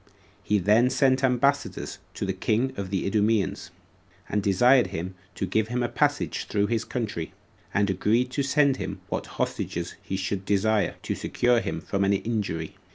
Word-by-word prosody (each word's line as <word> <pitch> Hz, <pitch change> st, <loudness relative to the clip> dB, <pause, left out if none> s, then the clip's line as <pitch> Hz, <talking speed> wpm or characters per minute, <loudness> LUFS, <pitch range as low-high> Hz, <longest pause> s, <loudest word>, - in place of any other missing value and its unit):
He 105 Hz, -, +2 dB
then 105 Hz, +6 st, +4 dB
sent 130 Hz, 0 st, +2 dB
ambassadors 135 Hz, +2 st, +1 dB, 0.2 s
to -, -, -2 dB
the 95 Hz, -, -1 dB
king 115 Hz, +7 st, 0 dB
of 100 Hz, -5 st, -4 dB
the 95 Hz, -1 st, -1 dB
Idumeans, 105 Hz, 0 st, +1 dB, 0.6 s
and 105 Hz, -, 0 dB
desired 120 Hz, +7 st, +4 dB
him 90 Hz, +3 st, -5 dB, 0.2 s
to -, -, -2 dB
give 105 Hz, +4 st, +1 dB
him 125 Hz, +1 st, -1 dB
a 120 Hz, -, 0 dB
passage -, -, 0 dB
through 100 Hz, -1 st, +1 dB
his 115 Hz, -1 st, 0 dB
country; 105 Hz, -11 st, -4 dB, 0.4 s
and 100 Hz, 0 st, +2 dB
agreed 110 Hz, +6 st, +1 dB
to 140 Hz, -, 0 dB
send 140 Hz, 0 st, +3 dB
him -, -, -5 dB
what -, -, -3 dB
hostages 85 Hz, +1 st, -2 dB
he 95 Hz, -, -4 dB
should 95 Hz, +1 st, -2 dB
desire, 105 Hz, +2 st, +1 dB
to -, -, -1 dB
secure 120 Hz, -1 st, +1 dB
him -, -, -3 dB
from 100 Hz, -1 st, -1 dB
an 100 Hz, +1 st, +3 dB
injury. 100 Hz, -6 st, -2 dB
105 Hz, 170 wpm, -26 LUFS, 95-125 Hz, 0.6 s, then